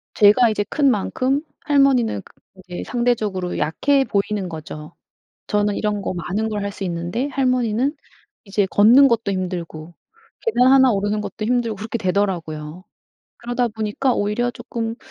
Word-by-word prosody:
제가 220 +3 +6
이제 210 -1 0
큰 285 -2 +2
만큼 255 +7 0 0.2
할머니는 275 -7 +3
그 - - -21 0.3
이제 180 -1 -6
상대적으로 215 -7 -1
약해 275 - +2
보이는 200 -2 -1
거죠. 155 -1 -9 0.5
저는 205 -1 +1
이런 210 -1 -1
거 - - -2
많은 185 +6 -2
걸 210 -1 -3
할 200 - -3
수 200 - -7
있는데 175 +9 -2
할머니는 255 0 0 0.5
이제 195 -1 0
걷는 235 +9 +6
것도 230 -3 0
힘들고 175 -3 -5 0.5
계단 260 - +3
1 265 -2 +6
오르는 205 +1 0
것도 215 +1 -5
힘들고 235 -2 0
그렇게 220 +3 -4
되더라고요. 180 -4 -2 0.6
그러다 245 0 -1
보니까 220 +4 -1
오히려 210 +4 0
쪼끔 230 -1 -5
210 Hz, 320 characters per minute, -21 LUFS, 190-245 Hz, 0.6 s, 제가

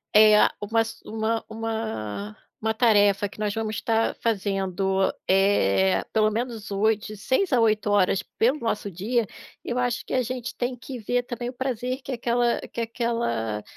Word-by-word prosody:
eh, 215 0 +8 0.2
uma 225 +2 +2
su 225 0 -9
uma 220 +1 -1
uma 220 - -4 0.2
uma 220 0 0
tarefa 205 -3 +3
que 210 - -15
nós 210 -1 -1
vamos 220 0 -2
estar 225 +1 0
fazendo, 195 -3 0 0.2
eh, 190 - +3
pelo 215 -1 +3
menos 225 -2 -4
8 210 +1 +1
de 215 - -7
6 260 - 0
a 250 - +5
8h 205 -3 +2 0.2
pelo 250 +6 +3
nosso 210 -4 -2
dia, 210 +5 -1 0.4
eu 245 - -3
acho 245 -1 0
que - - -12
a 255 - +2
gente 245 0 -5
tem 250 +1 -2
que 250 +2 -8
ver 245 +2 0
também 240 0 -5
o - - -8
prazer 255 0 -3
que 265 - -7
aquela 240 0 +1
que 235 - -6
aquela 225 - -2
220 Hz, 165 wpm, -25 LUFS, 200-240 Hz, 0.4 s, eh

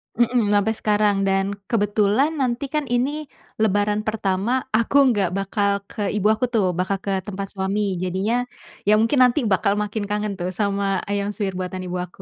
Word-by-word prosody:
Mhm, 240 -3 +2
sampai 205 +2 +2
sekarang, 210 -1 +2
dan 195 +1 +1 0.2
kebetulan 210 +5 +2
nanti 250 +1 0
kan, 300 -3 0
ini 275 +5 -1 0.3
Lebaran 205 0 +2
pertama, 215 +4 0
aku 230 +5 +1 0.2
nggak 200 -5 +1
bakal 200 0 0
ke 205 -2 -3
ibu 210 0 +2
aku 235 +4 0
tuh, 215 -4 +3
bakal 195 +2 0
ke 200 - -1
tempat 195 -1 -5
suami. 195 +2 -1 0.2
Jadinya, 205 +7 0 0.4
ya 210 - +6
mungkin 230 +5 +2
nanti 250 +3 +3
bakal 200 0 +2
makin 210 +1 -3
kangen 210 0 -1
tuh, 175 +1 -2
sama 200 -2 0
ayam 200 0 -1
suwir 200 -4 -2
buatan 185 0 -4
ibu 180 0 -3
aku. 180 +2 -17
205 Hz, 170 wpm, -22 LUFS, 195-225 Hz, 0.4 s, ya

